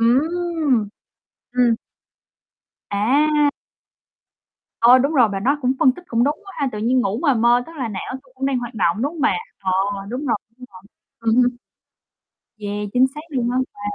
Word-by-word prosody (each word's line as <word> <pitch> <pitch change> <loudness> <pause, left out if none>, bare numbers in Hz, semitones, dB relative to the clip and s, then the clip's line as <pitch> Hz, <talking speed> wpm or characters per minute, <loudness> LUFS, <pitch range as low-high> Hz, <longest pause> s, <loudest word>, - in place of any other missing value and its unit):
Ừm! 295 -1 +1 0.7
Ừm. 245 -2 +3 1.1
À! 290 +8 +3 1.3
Ờ, 245 +2 +7
đúng 280 +5 +1
rồi. 245 -7 +5
Mà 195 -1 -3
nó 275 +8 +1
cũng 255 - +2
phân 260 - +5
tích 355 +7 -13
cũng 235 -4 +1
đúng 290 +2 0
quá 390 - -11
ha, 280 - 0
tự 210 - -5
nhiên 245 +4 +2
ngủ 210 -2 -1
mà 285 -5 +3
mơ 240 +1 +3
tức 330 - -12
là 255 -5 -3
não 200 +2 -5
tui 265 -2 -25
cũng 265 +1 -2
đang 270 -2 +1
hoạt 240 -1 -6
động, 170 -5 +1
đúng 285 - -1
hông 330 - -8
bà? - - +3 0.2
Ờ, 190 -1 -2 0.4
đúng 255 +6 -4
rồi, 235 - +2 0.2
đúng 250 - -11
rồi. 185 - -13 0.4
Ừm 230 0 +1
hưm. 245 0 +4 1.1
Yeah, 205 0 -4
chính 255 +1 +5
xác 300 - -6
luôn 250 -6 -1
á 250 - 0 0.2
bà. - - -15
250 Hz, 190 wpm, -21 LUFS, 230-285 Hz, 1.3 s, Ờ